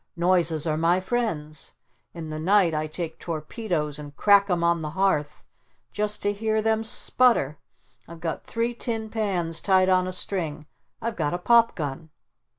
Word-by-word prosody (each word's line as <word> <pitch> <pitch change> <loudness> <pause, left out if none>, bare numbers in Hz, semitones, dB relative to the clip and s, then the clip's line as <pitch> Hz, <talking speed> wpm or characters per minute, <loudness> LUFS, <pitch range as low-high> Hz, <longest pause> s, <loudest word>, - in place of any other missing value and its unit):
Noises 170 -3 +2
are 155 -1 0
my 170 +3 +3
friends! 185 - -3 0.4
In 160 -2 -7
the 155 - -4
night 185 0 +3
I 155 0 -1
take 160 +1 -6
torpedoes 155 - -3
and 145 -1 -10
crack 200 -1 +5
'em 175 -2 +1
on 170 0 +2
the 155 -1 -4
hearth 160 -4 -1 0.5
just 210 0 -2
to 205 - +1
hear 220 +1 0
them 220 0 +1
sputter! 225 - +2 0.5
I've 170 0 -11
got 165 -1 -4
three 230 +1 -2
tin 225 -2 -4
pans 180 -7 -1
tied 190 -1 +3
on 185 0 +3
a - - -3
string! 165 -5 -3 0.4
I've 230 -1 -2
got 155 0 -1
a - - -1
pop 230 +5 +4
gun!" 150 0 -5
180 Hz, 165 wpm, -25 LUFS, 155-210 Hz, 0.5 s, crack